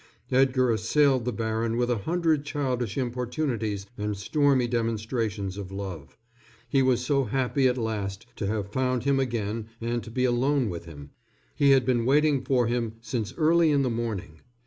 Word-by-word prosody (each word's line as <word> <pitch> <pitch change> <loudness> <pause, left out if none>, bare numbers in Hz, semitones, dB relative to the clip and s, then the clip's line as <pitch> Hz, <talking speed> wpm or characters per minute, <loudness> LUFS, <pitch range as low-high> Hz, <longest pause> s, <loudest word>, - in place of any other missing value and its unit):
Edgar 130 -1 +3
assailed 130 +3 +2
the 125 - 0
baron 115 +1 -1
with 120 0 +1
a 120 - 0
hundred 165 -4 +2
childish 130 -7 -2
importunities 120 -5 -2
and 105 0 -2
stormy 135 +3 +2
demonstrations 110 -4 -2
of 100 -2 -6
love. 95 -3 -7 0.5
He 135 +3 +2
was 125 -1 +2
so 140 -1 +2
happy 130 +3 +1
at 125 0 +1
last 105 -3 -3
to 100 - -2
have 105 -1 -3
found 130 -2 0
him 140 0 +2
again 115 -4 -2
and 120 0 -2
to - - -9
be 125 +3 0
alone 130 0 +2
with 85 -1 -7
him. 70 -4 -11 0.4
He 140 - +3
had 135 -2 +5
been 120 -2 +1
waiting 145 -1 +3
for 125 -2 +2
him 115 -1 -1
since 115 0 -4
early 165 0 +4
in 140 -2 +3
the 125 - 0
morning. 110 -9 -4
120 Hz, 170 wpm, -26 LUFS, 110-135 Hz, 0.5 s, had